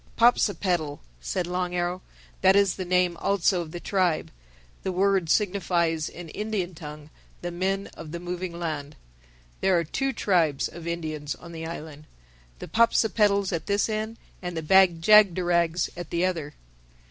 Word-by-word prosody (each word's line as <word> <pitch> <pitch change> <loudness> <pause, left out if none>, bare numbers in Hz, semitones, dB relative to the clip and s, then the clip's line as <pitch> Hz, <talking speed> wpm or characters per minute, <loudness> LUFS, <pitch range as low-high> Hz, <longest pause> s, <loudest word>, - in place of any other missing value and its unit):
"Popsipetel," 185 -10 +2 0.2
said 60 - -2
Long 180 0 -2
Arrow. 175 +1 -1 0.4
"That 190 0 +6
is 200 -2 +4
the 185 - -4
name 180 -1 +2
also 190 -1 +1
of 165 - -7
the 175 - -6
tribe. 180 -4 0 0.5
The 190 - -2
word 190 -2 +2
signifies 175 -5 +1
in 175 -1 -10
Indian 205 -2 -3
tongue, 150 -2 -10 0.3
The 175 - -3
Men 190 +3 -1
of 160 -2 -9
The 170 - -5
Moving 175 0 -5
Land. 155 -3 -4 0.6
There 190 -2 +3
are 170 - +1
two 270 - -1
tribes 170 - +1
of 170 0 -10
Indians 155 -3 -3
on 170 - -12
the 160 -1 -6
island: 155 -2 -8 0.5
the - - -8
Popsipetels 210 -3 +3
at 165 +1 -3
this 200 0 +2
end 220 +1 -3 0.2
and 180 -2 -5
the 160 - -3
Bag 180 0 +5
jagderags 175 -4 +4
at 175 -1 -7
the 170 +2 +1
other." 160 -5 -3
175 Hz, 160 wpm, -26 LUFS, 165-195 Hz, 0.6 s, That